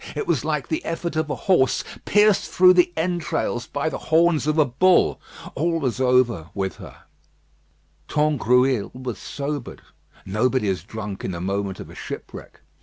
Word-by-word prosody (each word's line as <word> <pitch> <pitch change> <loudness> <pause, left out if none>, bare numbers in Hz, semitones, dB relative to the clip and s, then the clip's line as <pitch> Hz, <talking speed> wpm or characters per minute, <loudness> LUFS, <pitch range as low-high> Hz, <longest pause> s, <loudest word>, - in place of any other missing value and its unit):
It 150 - -2
was 155 -8 0
like 150 -4 -2
the 155 - -2
effort 165 0 -4
of 155 -1 -1
a - - -1
horse 180 -9 +3 0.2
pierced 210 0 +3
through 185 0 +6
the 180 -1 +4
entrails 160 -7 -2
by 145 +2 -2
the - - -3
horns 160 -1 +3
of 155 +1 +1
a 155 - +5
bull. 175 +9 +3 0.3
All 165 +3 0
was 130 -3 -2
over 125 -10 +2
with 95 -1 -3
her. - - -12 1.0
Tangrouille 130 -5 +2
was 125 -2 -6
sobered. 145 -2 -5 0.4
Nobody 110 +3 0
is 90 -4 -2
drunk 105 -1 -7
in - - -2
the 85 -2 -4
moment 95 +1 -3
of - - -9
a - - -12
shipwreck. - - -9
140 Hz, 165 wpm, -23 LUFS, 115-160 Hz, 1.0 s, through